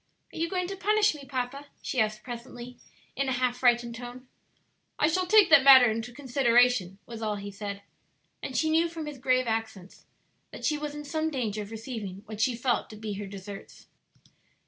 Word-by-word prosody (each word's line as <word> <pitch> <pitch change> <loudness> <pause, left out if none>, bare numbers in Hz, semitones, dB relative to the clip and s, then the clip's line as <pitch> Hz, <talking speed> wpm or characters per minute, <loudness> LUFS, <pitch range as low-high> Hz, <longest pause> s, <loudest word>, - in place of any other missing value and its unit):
"Are - - -9
you 335 +1 0
going 365 -2 -1
to 390 +2 -5
punish 420 +1 +2
me, 290 -2 -10
papa?" 270 +2 -4
she 260 - -3
asked 215 0 -1
presently, 245 0 -9 0.4
in 275 +1 -1
a - - +1
half 250 -1 0
frightened 240 -1 +3
tone. 245 +2 -9 0.7
"I 300 - +3
shall 365 +3 0
take 420 -3 +6
that 290 -4 +8
matter 260 -4 +8
into 225 +2 -4
consideration," 245 -7 +2
was 230 -1 -9
all 215 -1 -1
he 200 0 -7
said, 200 0 -6 0.6
and 260 - -4
she 315 -1 +1
knew 330 +2 +3
from 325 -2 -6
his 295 -3 -7
grave 255 0 +2
accents 220 -5 -5 0.4
that - - -8
she 305 - +2
was 295 0 -5
in 295 0 -7
some 315 +2 -1
danger 225 -8 -3
of 205 - -8
receiving 220 -4 -7
what 215 0 -6
she 245 +1 +2
felt 240 +1 -1
to 215 - -10
be 215 -1 -5
her 205 - -5
deserts. 195 0 -10
245 Hz, 195 wpm, -28 LUFS, 220-290 Hz, 0.7 s, that